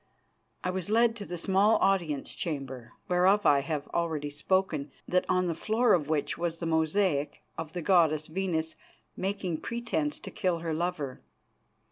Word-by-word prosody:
I 180 - 0
was 185 0 -3
led 230 +1 +4
to 205 - -7
the 175 - -4
small 195 +5 +3
audience 170 -8 +1
chamber, 135 -6 -5
whereof 185 +3 +3
I 145 - +6
have 150 0 -3
already 155 -4 -1
spoken, 155 -1 0 0.2
that 180 0 +1
on 185 0 +2
the 170 - 0
floor 220 +8 +2
of 155 -5 +1
which 155 0 0
was 170 -1 -1
the 170 - -5
mosaic 160 -1 +1
of 160 -1 -6
the 175 -2 -4
goddess 160 -5 +4
Venus 160 -2 -2 0.4
making 190 -3 -2
pretence 230 -11 -2
to - - -8
kill 180 -2 0
her 165 -1 -3
lover. 160 -5 -3
170 Hz, 160 wpm, -29 LUFS, 155-190 Hz, 0.4 s, I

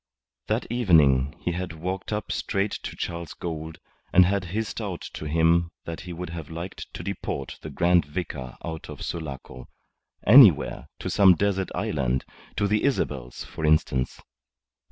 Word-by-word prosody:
That - - 0
evening 75 - +4
he 90 - -1
had 90 0 -4
walked 90 +5 -4
up 105 -1 -2
straight 100 +1 -1
to - - -6
Charles 85 -1 -5
Gould 80 -2 -5 0.3
and 90 0 +7
had 95 0 0
hissed 110 +5 -3
out 95 -5 -4
to - - -6
him 85 +2 +3 0.2
that 85 -1 -5
he - - -4
would 85 0 -6
have 80 -3 -7
liked 85 +3 -7
to - - -6
deport 70 - -4
the 80 - -7
Grand 85 +2 +3
Vicar 75 -6 -5
out 80 -1 -6
of - - -7
Sulaco, 70 -6 -6 0.6
anywhere, 100 - +7
to - - -4
some 95 -3 +6
desert 95 -1 0
island, 65 -3 -1 0.3
to 100 - +1
the 105 +1 +1
Isabels, 70 - -1
for - - -8
instance. 75 -4 +2
85 Hz, 155 wpm, -26 LUFS, 75-95 Hz, 0.6 s, and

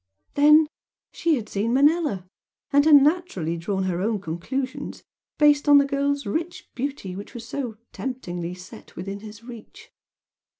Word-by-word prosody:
Then 300 +2 +6 0.4
she 330 -2 +1
had 225 -5 -5
seen 215 +4 -1
Manella, 290 - +2 0.5
and 285 +1 +5
had 310 -2 +8
naturally 285 - +2
drawn 190 +3 -2
her 180 -1 -1
own 215 +1 0
conclusions, 230 +10 -5 0.3
based 295 -1 +4
on 290 - +9
the 280 - +5
girl's 280 0 -1
rich 335 - -4
beauty 255 -8 -4
which 200 +4 -9
was 230 -1 -8
so 250 -5 -4
temptingly 180 -9 -5
set 185 +5 -13
within 195 +2 -6
his 215 +1 -11
reach. 235 -2 -12
245 Hz, 145 wpm, -24 LUFS, 195-285 Hz, 0.5 s, on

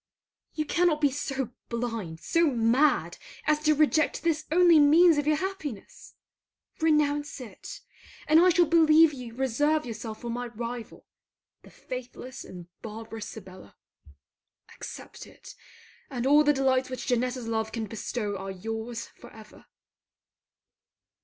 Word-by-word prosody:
You 305 - -1
cannot 340 -1 +2
be 290 -2 +3
so 270 -2 -3 0.2
blind, 230 -9 -4
so 335 0 +2
mad 250 +3 +2 0.3
as 305 0 +2
to 305 0 +4
reject 305 0 +2
this 315 -2 0
only 345 -1 +6
means 315 +2 +6
of 290 - -2
your 305 - +4
happiness. 310 - -6 0.6
Renounce 295 -3 +1
it, 225 -7 -10 0.5
and 310 +2 +6
I 360 +2 +6
shall 350 0 +4
believe 320 -1 +5
you 245 -4 -9
reserve 290 +5 +1
yourself 225 -2 -7
for 235 - -4
my 245 +1 -4
rival, 235 0 -7 0.6
the - - -16
faithless 255 0 -8
and 180 -2 -10 0.2
barbarous 225 0 -7
Sibella. 185 - -12 1.0
Accept - - -10
it, - - -14 0.6
and 250 -2 -4
all 295 +2 +6
the 295 - +4
delights 265 -2 +1
which 255 -1 -6
Janetta's 250 0 -1
love 220 -1 -2
can 225 -1 -3
bestow 210 0 -4
are 195 0 -6
your's 225 +4 -5
for 240 - -16
ever. 215 -1 -15
255 Hz, 135 wpm, -27 LUFS, 225-305 Hz, 1.0 s, only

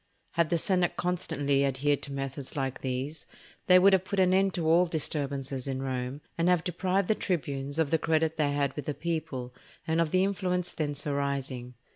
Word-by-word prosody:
Had 170 -2 +1
the 170 - +2
senate 180 +1 +1
constantly 145 -6 0
adhered 140 +1 +1
to 140 - -6
methods 135 0 -5
like 135 -2 -2
these, 135 +4 -3 0.4
they 180 - +8
would 195 +2 +6
have 190 -1 +4
put 195 +1 -2
an 185 -1 +4
end 195 +1 +3
to 165 -3 -1
all 170 +3 +5
disturbances 140 -4 -2
in 135 -1 -2
Rome, 130 +1 -3 0.2
and 170 +2 +3
have 180 -2 +3
deprived 185 +1 0
the - - +4
tribunes 145 -7 -2
of 160 -3 +1
the 160 - +3
credit 160 0 +1
they 150 -2 +1
had 145 -1 0
with 150 - -5
the 150 - -2
people, 155 -7 -3 0.3
and 165 0 +2
of 165 - +1
the 185 +3 +3
influence 180 -2 -1
thence 145 -2 -3
arising. 140 -3 -2
155 Hz, 195 wpm, -29 LUFS, 140-175 Hz, 0.4 s, they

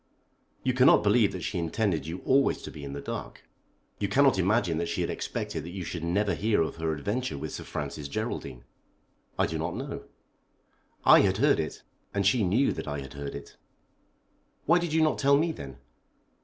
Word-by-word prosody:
You 130 - +1
cannot 125 +1 +6
believe 105 0 +4
that 90 -3 -6
she 90 - -2
intended 85 -2 -1
you 85 +3 -6
always 135 +1 +3
to - - -7
be 75 - -10
in 70 -1 -6
the 70 - -5
dark. - - -6 0.6
You 100 - 0
cannot 135 0 +4
imagine 95 -3 +2
that 85 - -1
she 85 +1 -1
had 85 - -1
expected 80 - -4
that 85 - -7
you 95 - -4
should 85 -1 -5
never 100 +4 +1
hear 110 0 +1
of 80 - -5
her 80 -1 -1
adventure 100 - -2
with - - -5
Sir - - -6
Francis 75 0 -5
Geraldine." 65 -3 -4 0.7
"I - - +3
do - - -3
not - - -2
know." - - -6 1.0
"I - - +9
had - - +3
heard - - +3
it, - - -4 0.3
and 100 -1 +1
she 110 +3 +4
knew 110 +9 +2
that - - -6
I 75 -1 -3
had 65 - -9
heard 70 0 -6
it." 70 - -10 1.1
"Why 170 +3 +5
did 175 -2 -3
you 160 0 +3
not 155 - +1
tell 140 0 +5
me, 165 +3 +1
then?" 70 - -9
95 Hz, 200 wpm, -28 LUFS, 75-125 Hz, 1.1 s, I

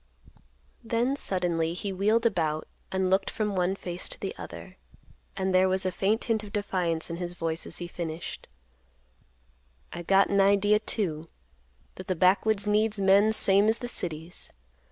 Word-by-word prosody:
Then 235 +3 0
suddenly 175 -8 -1
he 195 +1 -3
wheeled 215 +5 +2
about 155 -8 0 0.2
and 190 -1 0
looked 195 +1 +2
from 210 -2 -2
one 185 +1 +1
face 175 -2 -6
to - - -10
the - - -4
other; - - -10 0.6
and 190 -1 0
there 185 +1 +5
was 190 0 +1
a 185 - +1
faint 200 +5 0
hint 220 -2 0
of 205 - -9
defiance 180 -6 -1
in 170 - -4
his 175 0 -5
voice, 165 -1 -3
as - - -4
he 175 - -5
finished; 170 -1 -6 1.5
"I 175 - -5
got 195 +3 +4
an 200 0 +3
idea, 200 +2 +4
too, 165 -8 -3 0.7
that 185 - -8
the 185 - 0
backwoods 195 +4 +3
needs 210 0 +1
men 200 +2 +5
same 200 -1 +3
as 225 - +2
the 245 - -5
cities. 170 -6 -5
190 Hz, 165 wpm, -28 LUFS, 175-210 Hz, 1.5 s, there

